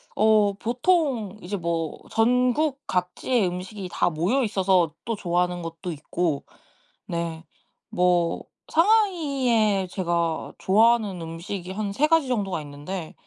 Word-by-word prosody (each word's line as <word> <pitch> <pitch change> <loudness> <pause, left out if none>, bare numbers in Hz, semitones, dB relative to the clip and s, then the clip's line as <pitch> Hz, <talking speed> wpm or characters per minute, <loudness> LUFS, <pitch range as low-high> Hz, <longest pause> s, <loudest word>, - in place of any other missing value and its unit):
어 215 -1 +4
보통 245 - 0
이제 200 +3 -4
뭐 165 -3 -2
전국 250 +5 +2
각지의 185 +5 0
음식이 185 +2 -6
다 - - +2
모여 185 - +1
있어서 190 -6 +2
또 230 - -1
좋아하는 180 -2 0
것도 165 +2 -6
있고 155 0 -2 0.6
네 170 -1 -3 0.5
뭐 175 -1 +2 0.3
상하이에 280 - +2
제가 170 -3 -1
좋아하는 215 -2 +3
음식이 170 +3 -6
한 205 0 -3
3 295 +9 +2
가지 325 -3 +3
정도가 200 -8 -1
있는데 150 +4 -7
195 Hz, 240 characters per minute, -25 LUFS, 175-235 Hz, 0.6 s, 어